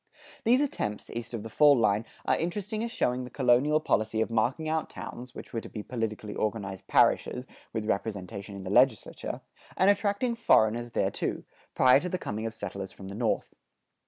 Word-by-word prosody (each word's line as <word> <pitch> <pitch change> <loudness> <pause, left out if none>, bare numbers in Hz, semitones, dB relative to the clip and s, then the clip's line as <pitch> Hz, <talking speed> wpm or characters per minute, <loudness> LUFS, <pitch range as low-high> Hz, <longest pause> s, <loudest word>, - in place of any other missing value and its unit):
These 245 +4 +5
attempts, 105 - -2
east 115 -1 -5
of 105 - -5
the 115 - -7
fall 145 +5 +6
line, 110 -1 +2 0.2
are - - +3
interesting 205 +6 -2
as 235 - -2
showing 125 - 0
the 125 - -7
colonial 135 +4 +3
policy 110 -7 0
of 110 - 0
marking 120 +8 +1
out 160 0 -1
towns 120 +2 -8
(which - - -10
were 115 - -1
to - - -10
be 105 - -6
politically 110 -3 -4
organized 100 -3 -3
parishes, 125 +1 +3 0.3
with 110 -1 -3
representation 100 -1 -3
in 100 - -7
the 95 - -5
legislature), 120 0 +2 0.4
and 190 +2 +6
attracting 205 +4 0
foreigners 120 - +3
thereto, - - -1 0.3
prior 130 +1 +6
to 180 - -4
the 185 - -1
coming 110 -8 -4
of 110 - -6
settlers 100 -2 -5
from 95 -1 -10
the - - -7
North. 115 +1 -1
115 Hz, 185 wpm, -29 LUFS, 105-155 Hz, 0.4 s, fall